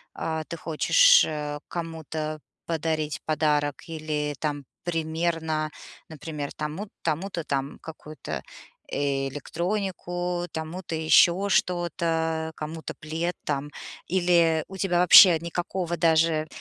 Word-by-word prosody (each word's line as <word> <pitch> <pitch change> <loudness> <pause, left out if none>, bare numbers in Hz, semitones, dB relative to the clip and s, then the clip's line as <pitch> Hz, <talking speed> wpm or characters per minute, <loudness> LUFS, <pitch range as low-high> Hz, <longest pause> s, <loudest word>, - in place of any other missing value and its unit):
а, 160 -1 -3
ты 170 - -7
хочешь, - - +5
э, 150 -1 -3
кому-то 160 -2 -5 0.3
подарить 155 -2 -2
подарок 150 -2 0
или 155 -2 -3
там 145 -1 -3 0.2
примерно, 160 -1 -1 0.4
например, 150 -2 -6
тому, 155 +7 -4 0.2
тому-то 170 +2 -2
там 140 -1 -3
какую-то 155 -1 -7 0.5
электронику, 175 +6 -2
тому-то 165 +2 -5
еще 170 +4 +4
что-то, 165 -3 0
кому-то 155 +1 -6
плед 165 +3 -3
там, 145 0 -2 0.4
или 170 -3 +3
у 190 - -8
тебя 180 -2 +1
вообще 180 0 +9
никакого 175 +1 -3
даже, 160 -1 +3
160 Hz, 100 wpm, -26 LUFS, 155-175 Hz, 0.5 s, вообще